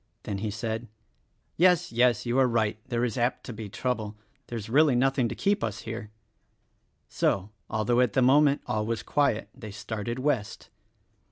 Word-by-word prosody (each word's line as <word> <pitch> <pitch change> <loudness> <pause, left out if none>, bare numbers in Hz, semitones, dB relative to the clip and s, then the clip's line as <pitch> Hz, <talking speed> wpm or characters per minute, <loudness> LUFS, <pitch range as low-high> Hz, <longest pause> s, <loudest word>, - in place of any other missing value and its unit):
Then 100 -1 -4
he 110 +1 -2
said, 110 +2 -4 0.7
"Yes, 180 0 +4
yes, 120 -1 +3
you 120 +2 +1
are 130 - +5
right 110 -3 0
— - - -35
there 120 -1 +1
is 120 +1 -3
apt 120 +2 0
to 125 - -7
be 110 -1 -7
trouble. 110 -2 -3 0.3
There 120 - -5
is 105 - -6
really 140 +3 +4
nothing 130 0 +2
to - - -5
keep 200 - +1
us 110 -2 -3
here." 115 -1 -6 1.0
So, 100 +2 0 0.2
although 110 +3 +1
at 125 -5 +3
the 130 - +3
moment 140 +2 +4
all 110 0 -1
was 115 -1 -2
quiet, 140 -7 +1
they 115 -5 -9
started 110 +3 -5
West. 130 -6 -2
120 Hz, 180 wpm, -27 LUFS, 110-130 Hz, 1.0 s, are